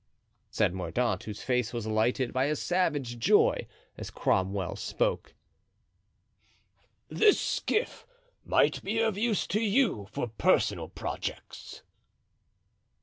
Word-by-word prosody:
said - - +1
Mordaunt, 105 +3 -2
whose 105 -2 -7
face 125 -3 0
was 115 -2 -4
lighted 115 +3 0
by 130 +1 +1
a 150 +1 0
savage 145 -10 -1
joy 115 - +3 0.3
as - - -6
Cromwell 95 -1 -1
spoke: - - -2 1.7
"This 425 -2 +4
skiff 440 - -2 0.4
might - - +2
be 215 +3 -2
of 225 -3 +1
use 215 0 0
to 210 - -1
you 215 - +1
for - - -3
personal 110 -2 +1
projects." - - -7
125 Hz, 110 wpm, -29 LUFS, -, 1.7 s, This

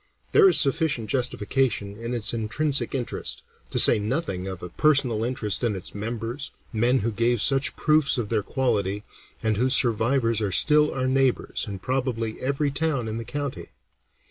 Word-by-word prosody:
There 405 -3 +6
is - - +6
sufficient 135 -6 0
justification 120 -4 -1
in 115 +3 -5
its 110 -1 -1
intrinsic 135 +7 0
interest, 125 -3 -4 0.3
to - - -3
say - - +7
nothing 105 - -3
of 95 -2 -7
a 90 - -6
personal 130 - +2
interest 115 -3 -2
in 115 -4 0
its 95 - -8
members, 115 +5 -5 0.2
men 120 +3 +2
who 115 +3 -1
gave 115 +2 +1
such 135 +5 +1
proofs 155 -3 +2
of 115 -4 -3
their 110 -2 0
quality, 105 -4 -1 0.4
and 110 -2 0
whose 130 +3 +5
survivors 115 -1 +3
are 100 -2 -1
still 150 - +3
our 130 -1 -2
neighbors 135 -1 0
in 100 -1 -5
probably 120 0 -3
every 140 +2 -1
town 140 -5 -1
in 110 0 -4
the - - -5
county. 140 -9 -6
120 Hz, 170 wpm, -24 LUFS, 110-135 Hz, 0.4 s, say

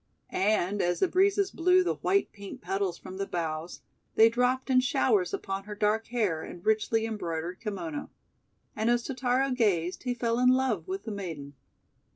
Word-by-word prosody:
And, 200 0 +1
as 175 0 +1
the - - +3
breezes 390 +2 +2
blew 365 +2 +4
the - - 0
white 395 0 0
pink 200 -1 -9
petals 190 0 -2
from 185 0 -9
the 195 0 -3
boughs, 165 -1 -4 0.3
they 225 +1 +7
dropped 250 +3 0
in 255 - +6
showers 250 -7 +2
upon 195 0 -4
her 210 0 -7
dark 215 +2 +1
hair 210 -10 0
and 175 +3 -10
richly 220 +1 +2
embroidered 175 -5 -4
kimono. 180 -9 -5 0.7
And 220 +2 0
as 240 0 +2
Totaro 260 +1 0
gazed 190 -8 +1
he 250 -1 -2
fell 235 0 0
in 250 0 +5
love 255 -9 +1
with 190 +1 -4
the 225 - -5
maiden. 165 -8 -6
215 Hz, 175 wpm, -28 LUFS, 185-250 Hz, 0.7 s, they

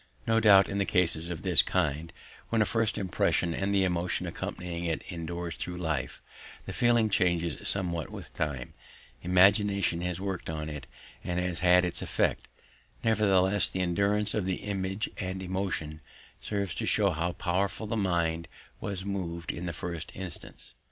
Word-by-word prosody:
No 115 0 +3
doubt 100 -3 +7
in 100 0 0
cases 85 -3 +2
of 85 -3 -5
this - - +6
kind, 75 +3 -1 0.4
when 115 - +1
a 110 - +4
first 115 -1 +1
impression 90 -3 +1
and 95 +3 -1
the 100 -1 +3
emotion 90 -1 0
accompanying 85 -1 -5
it 80 -2 -1
endures 85 0 -4
through 90 0 -5
life, 80 -6 -3 0.4
the - - -5
feeling 120 -2 +3
changes 85 -5 +1
somewhat 85 -5 0
with - - -9
time; 70 -5 -3 0.5
imagination 95 0 +3
has 90 0 -2
worked 95 -3 -4
on 80 -1 -4
it 75 -1 -7 0.4
and 90 0 -1
has 90 -2 -1
had 90 +1 +5
its 90 - -2
effect; - - 0 0.6
nevertheless 100 -3 +4
the 95 - -2
endurance 100 +4 +1
of 105 -4 0
the 95 -1 0
image 95 +1 -2
and 95 -1 -4
emotion 90 -5 -3 0.4
serves 100 -5 -2
to - - -3
show - - +3
how 85 +2 -1
powerful 95 +4 -1
the 110 - -2
mind 85 -5 0 0.3
was 95 -2 -4
moved 85 -4 -3
in 85 +1 -5
the - - -1
first 85 0 -5
instance. 95 -2 -8
90 Hz, 160 wpm, -29 LUFS, 85-100 Hz, 0.6 s, doubt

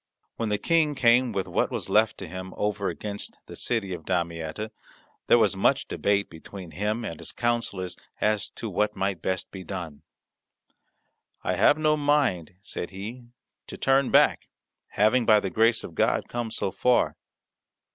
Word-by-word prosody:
When 115 -2 -2
the 105 - +1
King 160 +2 +2
came 120 -1 +4
with 95 -3 -2
what - - +1
was - - -4
left 110 +1 +3
to 95 - -7
him 95 +2 -7
over 105 -1 -1
against 100 +4 -5
the - - -10
city 110 -6 -1
of 85 -2 -7
Damietta 85 +3 -2 0.6
there - - +7
was - - +3
much - - +2
debate 100 0 +1
between 85 +2 -10
him 105 +7 -2
and 85 -5 -6
his - - -5
counsellors 115 -7 -2 0.2
as 105 -1 +1
to - - -5
what 105 0 0
might 95 -3 -1
best 95 0 -2
be 95 -1 -8
done. 85 -7 -6 1.4
"I 90 - 0
have 105 - +4
no 155 0 +3
mind," 145 - +1
said 90 - -4
he, 110 +6 -8 0.4
"to - - -7
turn 135 0 +3
back, - - +4 0.4
having, 110 +4 +3
by 110 -2 +6
the 95 -2 -3
grace 115 +4 +3
of - - -8
God, - - +1
come 120 -1 -3
so 95 - -1
far. 125 +4 +2
105 Hz, 165 wpm, -26 LUFS, 95-120 Hz, 1.4 s, there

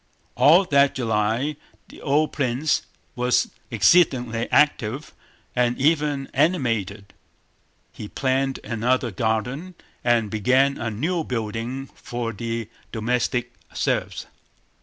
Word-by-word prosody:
All 175 +6 +6
that 140 -4 +3
July 115 +4 0 0.3
the - - -14
old 150 +2 +1
prince 135 +2 0 0.3
was 125 0 +1 0.2
exceedingly 120 - +3
active 140 -2 +1 0.4
and 125 -1 +1
even 145 -1 +1
animated. 115 - 0 0.8
He 105 - -8
planned 135 +2 -1
another 120 +1 0
garden 120 - -2 0.3
and 115 -3 +2
began 130 +6 +2
a 115 - -2
new 160 - -1
building 115 +2 -4
for 120 -1 -5
the 115 +1 -4 0.2
domestic 120 +1 -1 0.2
serfs. - - -1
125 Hz, 100 wpm, -23 LUFS, 115-140 Hz, 0.8 s, All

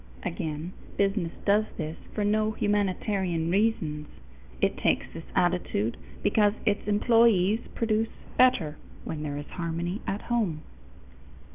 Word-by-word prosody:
Again, 155 - -3 0.2
business 195 -4 +1
does 210 +2 +4
this 155 +1 -3 0.2
for 210 - 0
no 215 +1 +2
humanitarian 190 -5 0
reasons; 170 -8 +1 0.5
it - - +2
takes - - +1
this 165 - -8
attitude 175 - +1 0.3
because 205 -1 +4
its 205 -1 +1
employees 215 -2 +4 0.2
produce 225 -1 +1 0.3
better 210 -13 +4 0.3
where 160 - -4
there 150 -1 -3
is 145 - -5
harmony 170 +3 -3
at 200 +2 -2
home. 205 -11 0
195 Hz, 120 wpm, -28 LUFS, 165-215 Hz, 0.5 s, does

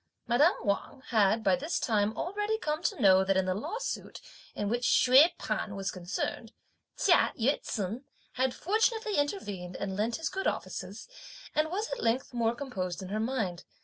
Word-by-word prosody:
Madame 290 - +4
Wang 205 +6 -2
had 220 -1 +3
by - - +4
this 295 +5 -2
time 215 -2 +1
already 415 +4 -1
come 305 -6 -2
to - - -1
know 190 -1 +6
that 190 0 +1
in 190 - +2
the 185 - 0
lawsuit, 430 - -4 0.4
in 205 - -2
which 240 +3 -1
Hsüeh 270 +7 +6
P'an 200 - -3
was 195 -1 -2
concerned, 185 +5 -4 0.5
Chia 355 -4 +4
Yü 260 +6 +2
ts'un 220 +6 -4 0.3
had 260 0 0
fortunately 435 +2 +1
intervened 205 - -2
and 195 -1 -4
lent 220 +4 0
his 325 - -2
good 385 - -2
offices, - - -4 0.5
and 310 +1 +1
was 410 +6 -2
at - - -3
length 245 +3 0
more 235 -1 +1
composed 190 -10 -4
in 185 - -7
her 210 +2 -2
mind. 220 -7 -2
235 Hz, 175 wpm, -30 LUFS, 200-310 Hz, 0.5 s, know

